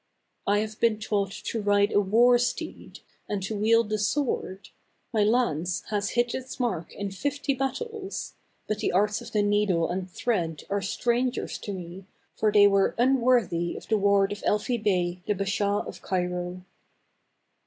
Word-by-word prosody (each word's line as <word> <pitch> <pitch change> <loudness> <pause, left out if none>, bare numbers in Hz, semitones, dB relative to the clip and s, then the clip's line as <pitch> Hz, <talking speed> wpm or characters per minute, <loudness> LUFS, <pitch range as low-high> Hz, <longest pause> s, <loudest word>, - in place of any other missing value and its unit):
" - - -49
I 205 +1 +3
have 215 0 -5
been 230 -2 +3
taught 205 -3 0
to 220 +2 -4
ride 205 0 +3
a 205 - +4
war 240 +5 +5
steed, 245 - -4 0.3
and 200 -2 -2
to 215 +3 -3
wield 225 +1 +3
the 215 0 -1
sword; 210 -4 -1 0.4
my 215 -2 +3
lance 195 -7 +1
has 205 -1 -1
hit 240 0 +2
its 260 +1 -6
mark 185 -10 -2
in 200 -1 -4
fifty 285 +7 -1
battles; 385 - -4 0.3
but 215 -1 -2
the - - 0
arts 205 +2 +1
of - - -10
the 210 -1 +2
needle 205 -5 +2
and 185 +1 -3
thread 175 - -2
are 200 0 +1
strangers 245 +6 -1
to 205 - -6
me, 185 +1 -8 0.3
for 215 - +2
they 205 -1 +7
were 195 -1 +3
un 255 +2 +3
worthy 200 -9 +2
of - - -11
the 220 - +3
ward 200 0 +3
of 205 - -4
Elfi 215 +3 0
Bey, 180 -3 0
the 210 - +1
Bashaw 200 +1 0
of - - -9
Cairo." 180 0 -3
205 Hz, 175 wpm, -27 LUFS, 190-235 Hz, 0.4 s, they